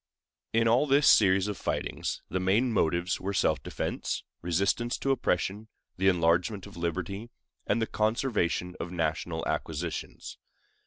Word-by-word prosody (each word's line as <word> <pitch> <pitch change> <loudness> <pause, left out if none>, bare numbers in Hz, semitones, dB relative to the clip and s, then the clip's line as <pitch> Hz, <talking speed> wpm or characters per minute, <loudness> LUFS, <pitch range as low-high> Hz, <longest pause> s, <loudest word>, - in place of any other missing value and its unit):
In 115 0 +3
all 125 +6 +4
this 140 +1 +4
series 95 -1 +5
of 105 -3 -3
fightings - - -3
the 95 - -2
main 105 +7 +2
motives 85 -1 +1
were 100 +1 -3
self - - +2
defense, - - -3 0.2
resistance 100 +7 0
to 135 - 0
oppression, 105 -3 0 0.3
the 95 +1 +2
enlargement 90 +2 +2
of - - -12
liberty, 95 +6 -3 0.4
and - - +2
the 115 - +1
conservation 110 -6 0
of 85 - -5
national 80 -1 -2
acquisitions. 80 +1 -4
95 Hz, 140 wpm, -29 LUFS, 85-110 Hz, 0.4 s, series